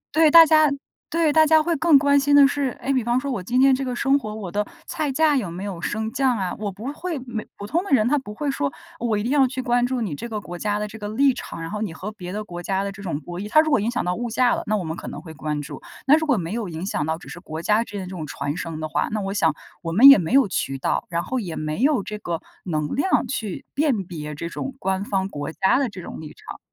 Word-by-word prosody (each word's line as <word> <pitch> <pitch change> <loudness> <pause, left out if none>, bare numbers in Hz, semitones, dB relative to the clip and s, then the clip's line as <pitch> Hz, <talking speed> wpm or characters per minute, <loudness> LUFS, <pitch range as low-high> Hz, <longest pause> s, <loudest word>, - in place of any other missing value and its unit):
对， 320 -1 +6
大 330 +1 +10
家 310 -2 +5 0.4
对， 325 -3 +2
大 315 - +6
家 315 0 +5
会 340 0 0
更 315 -1 +5
关 285 0 +4
心 285 +1 +3
的 280 -1 +8
是， 285 0 -1
哎， 275 - -1
比 255 -3 +1
方 240 +2 +1
说 280 0 -3
我 230 - -2
今 240 +7 0
天 270 0 +6
这 270 +1 0
个 250 -1 -3
生 275 +2 +2
活， 215 -4 -6
我 195 -5 -6
的 210 +1 0 0.2
菜 310 -4 -2
价 305 +1 +3
有 210 -10 -1
没 180 +4 -6
有 185 -5 -5
升 220 +4 -2
降 265 -3 +1
啊， 185 -2 -2
我 205 -2 -3
不 205 +6 -10
会 335 -1 -4
没 225 -3 -5
普 200 - -7
通 335 - 0
的 - - -8
人， 240 -4 +4
他 290 +2 +2
不 210 -5 -9
会 290 +1 -1
说， 140 - -1 0.3
呃， 235 - -2
我 215 -2 +1
一 205 - -2
定 245 - -1
要 275 -3 +4
去 260 +1 -6
关 245 0 +2
注 255 -2 -2
你 190 -9 -2
这 235 +11 -6
个 215 - -3
国 175 -3 -8
家 210 -1 0
的 210 0 -2
这 220 +1 -10
个 205 - -5
立 270 +4 +3
场， - - -7
然 165 - -6
后 210 0 -4
你 175 -7 -3
和 210 +6 -6
别 180 -4 -8
的 210 +2 -4
国 175 -3 -8
家 195 +2 -1
的 200 - -3
这 200 0 -11
种 165 -6 -3
博 175 +4 -7
弈。 210 +2 -5
它 310 - +5
如 310 -1 +3
果 285 - +4
影 215 - 0
响 240 -6 -2
到 180 - 0
物 240 +4 -3
价 245 +2 +3
了， - - -1
那 215 0 +1
我 185 - -3
们 160 0 -4
可 - - -8
能 145 - -6
会 160 0 -10
关 150 0 -3
注， 145 -1 -8 0.2
那 285 +2 +7
如 315 0 0
果 265 -6 +3
没 170 +1 -3
有 225 -5 -3
影 165 +3 -5
响 155 -6 -2
到， 160 - -1
只 - - -14
是 - - -8
国 160 -2 -7
家 215 +2 +3
之 220 - -14
间 200 - -3
的 - - -6
这 185 - -9
种 160 -5 -6
传 145 +2 -3
声 165 -2 -5
的 155 - -3
话， 150 - 0
那 215 - -2
我 195 0 -3
想 160 -7 +2 0.3
我 165 -2 -4
们 245 +10 +9
也 275 - +9
没 165 - -3
有 270 -5 +6
渠 135 -7 -2
道， - - -1
然 170 0 -1
后 255 - -2
也 175 -8 -5
没 155 +7 -3
有 275 -6 +3
这 210 +1 -6
个 170 -4 -3 0.3
能 155 -4 -2
量 370 +8 +2
去 215 -8 -4
辨 275 -9 +1
别 150 -4 -6
这 170 - -5
种 265 +10 -5
官 190 -2 -1
方 190 -2 -1
国 145 -3 -5
家 190 +9 +2
的 270 - 0
这 185 -4 -9
种 - - -8
立 155 - -10
场， - - -10
215 Hz, 330 characters per minute, -23 LUFS, 175-270 Hz, 0.4 s, 大